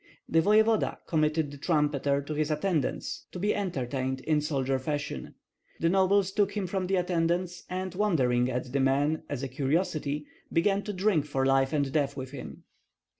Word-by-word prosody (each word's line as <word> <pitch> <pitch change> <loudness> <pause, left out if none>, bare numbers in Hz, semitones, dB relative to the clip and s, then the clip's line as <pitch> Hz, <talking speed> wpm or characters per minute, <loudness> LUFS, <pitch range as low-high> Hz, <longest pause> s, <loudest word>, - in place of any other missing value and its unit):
The 165 - +3
voevoda 215 +3 +3
committed 155 -2 +1
the 145 - -10
trumpeter 145 -3 +1
to 150 - -5
his 150 0 0
attendants 155 -1 -1
to - - -5
be 205 +4 +1
entertained 130 -8 -2
in 155 -1 +1
soldier 135 -3 0
fashion; 140 - -4 0.4
the 165 - +2
nobles 190 +1 +3
took 205 +1 +1
him 200 - 0
from 185 0 -2
the 195 - +1
attendants, 175 0 0
and 185 0 -3
wondering 130 -12 +2
at 125 0 -3
the 140 - +2
man 140 +4 +2
as 145 -2 -3
a - - -1
curiosity, 150 +2 -1 0.3
began 195 +4 +2
to 210 - -3
drink 185 -5 +2
for 135 -3 -1
life 135 0 +3
and 140 -3 0
death 140 -1 0
with 130 -1 -5
him. 140 - -9
155 Hz, 175 wpm, -28 LUFS, 140-185 Hz, 0.4 s, The